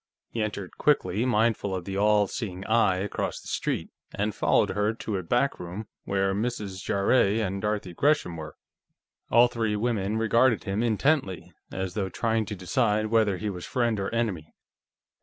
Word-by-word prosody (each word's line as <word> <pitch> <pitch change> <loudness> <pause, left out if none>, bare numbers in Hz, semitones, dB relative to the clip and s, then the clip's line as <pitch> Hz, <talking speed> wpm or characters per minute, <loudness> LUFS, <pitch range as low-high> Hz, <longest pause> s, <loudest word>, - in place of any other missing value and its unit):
He 115 - -2
entered 100 -3 -4
quickly, 115 -6 +2
mindful 110 -4 +1
of 90 -2 -5
the 95 - -4
All 105 +1 +4
Seeing 95 -3 -5
Eye 110 -4 +3
across 95 +2 -3
the - - -13
street, - - -2 0.2
and 105 +1 -1
followed - - +2
her 105 +3 0
to 110 -3 -3
a - - -2
back 120 +10 0
room, 90 +5 -6 0.2
where 95 0 +1
Mrs. 105 -3 -3
Jarrett 100 +1 +2
and 100 -2 -2
Dorothy 105 -4 -2
Gresham 140 - +1
were. 80 -1 -8 0.7
All 120 +1 +6
three 115 -3 -1
women 105 -2 -1
regarded 115 +2 +3
him 100 +2 -1
intently, 115 - 0 0.2
as 95 -1 -3
though 95 -1 -2
trying 110 +3 0
to 105 - -4
decide 105 +3 0
whether 110 -4 +3
he 105 +3 -3
was 90 -2 -7
friend 120 -5 0
or 100 - -2
enemy. 105 -9 -2
105 Hz, 170 wpm, -27 LUFS, 95-115 Hz, 0.7 s, All